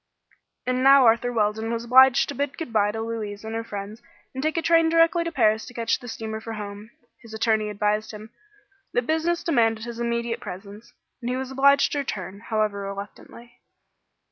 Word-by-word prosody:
And 255 Hz, 0 st, 0 dB
now 275 Hz, -1 st, +7 dB
Arthur 235 Hz, +2 st, +3 dB
Weldon 220 Hz, 0 st, 0 dB
was 230 Hz, 0 st, -2 dB
obliged 255 Hz, +1 st, +6 dB
to -, -, -3 dB
bid 280 Hz, 0 st, -3 dB
good 315 Hz, -8 st, -6 dB
bye 205 Hz, -1 st, +3 dB
to 220 Hz, +1 st, -5 dB
Louise 215 Hz, -3 st, -5 dB
and 220 Hz, -, -5 dB
her 225 Hz, 0 st, -3 dB
friends 205 Hz, +1 st, -7 dB, 0.3 s
and 265 Hz, -, -4 dB
take 310 Hz, +3 st, -1 dB
a -, -, +2 dB
train 330 Hz, -1 st, +4 dB
directly 330 Hz, +1 st, +3 dB
to 335 Hz, -, -4 dB
Paris 215 Hz, -8 st, +2 dB
to 245 Hz, -, -12 dB
catch 230 Hz, -1 st, 0 dB
the 245 Hz, -, -11 dB
steamer 220 Hz, -1 st, -5 dB
for 225 Hz, 0 st, -6 dB
home. 205 Hz, 0 st, -8 dB, 0.3 s
His 225 Hz, -2 st, -11 dB
attorney 220 Hz, -1 st, +1 dB
advised 210 Hz, +1 st, -1 dB
him 215 Hz, +1 st, -10 dB, 0.6 s
that 245 Hz, -, 0 dB
business 325 Hz, +3 st, 0 dB
demanded 225 Hz, -8 st, +1 dB
his 235 Hz, -1 st, -7 dB
immediate 235 Hz, 0 st, -2 dB
presence, 200 Hz, +4 st, -10 dB, 0.3 s
and 240 Hz, -, -3 dB
he 250 Hz, -, -1 dB
was 265 Hz, 0 st, -5 dB
obliged 280 Hz, +1 st, +4 dB
to 290 Hz, -, -1 dB
return, 200 Hz, -7 st, -5 dB
however 215 Hz, -2 st, -1 dB
reluctantly. 200 Hz, +4 st, -9 dB
230 Hz, 195 wpm, -24 LUFS, 215-260 Hz, 0.6 s, now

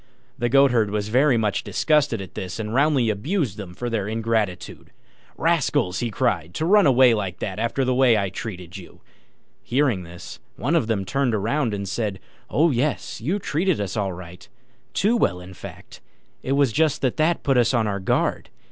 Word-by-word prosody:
The 120 Hz, -2 st, -1 dB
Goatherd 125 Hz, -5 st, +4 dB
was 105 Hz, 0 st, -2 dB
very 130 Hz, +2 st, +3 dB
much 105 Hz, -3 st, 0 dB
disgusted 145 Hz, -8 st, +1 dB
at 95 Hz, -, -12 dB
this, 90 Hz, -1 st, -5 dB
and 110 Hz, -1 st, -4 dB
roundly 135 Hz, -4 st, +3 dB
abused 130 Hz, -, -2 dB
them 95 Hz, -4 st, -8 dB
for 120 Hz, -, -4 dB
their 110 Hz, -4 st, -2 dB
ingratitude. 110 Hz, -4 st, -2 dB, 0.5 s
"Rascals!" 90 Hz, -1 st, +1 dB
he 120 Hz, -, -1 dB
cried, 90 Hz, -6 st, -1 dB
"to 160 Hz, -, -1 dB
run 200 Hz, -1 st, +5 dB
away 130 Hz, -2 st, +6 dB
like 95 Hz, -4 st, -3 dB
that 95 Hz, 0 st, -5 dB
after 115 Hz, +4 st, 0 dB
the 130 Hz, -, +1 dB
way 125 Hz, -3 st, +4 dB
I've 100 Hz, -2 st, -1 dB
treated 90 Hz, -7 st, -7 dB
you!" -, -, -13 dB, 0.6 s
Hearing 125 Hz, -6 st, +1 dB
this, 85 Hz, 0 st, -10 dB, 0.2 s
one 145 Hz, +10 st, -1 dB
of 155 Hz, -9 st, +2 dB
them 105 Hz, -4 st, -1 dB
turned 135 Hz, +2 st, 0 dB
round 115 Hz, +5 st, 0 dB
and 100 Hz, -1 st, -5 dB
said, 100 Hz, -1 st, -3 dB, 0.3 s
"Oh, 160 Hz, +2 st, +3 dB
yes, 130 Hz, -3 st, -2 dB
you 165 Hz, -, 0 dB
treated 175 Hz, -, 0 dB
us 100 Hz, 0 st, -3 dB
all 100 Hz, -3 st, -1 dB
right 90 Hz, +6 st, -11 dB, 0.5 s
too 215 Hz, +5 st, +2 dB
well, 90 Hz, -, +1 dB
in 90 Hz, +1 st, -11 dB
fact; 85 Hz, -, -11 dB, 0.4 s
it 135 Hz, -, -1 dB
was 140 Hz, -3 st, +3 dB
just 155 Hz, 0 st, +1 dB
that 130 Hz, -, 0 dB
that 160 Hz, +2 st, +1 dB
put 135 Hz, -2 st, +2 dB
us 120 Hz, -, +3 dB
on 120 Hz, -4 st, +1 dB
our 100 Hz, -1 st, -2 dB
guard. 95 Hz, -, -1 dB
115 Hz, 190 wpm, -23 LUFS, 100-140 Hz, 0.6 s, away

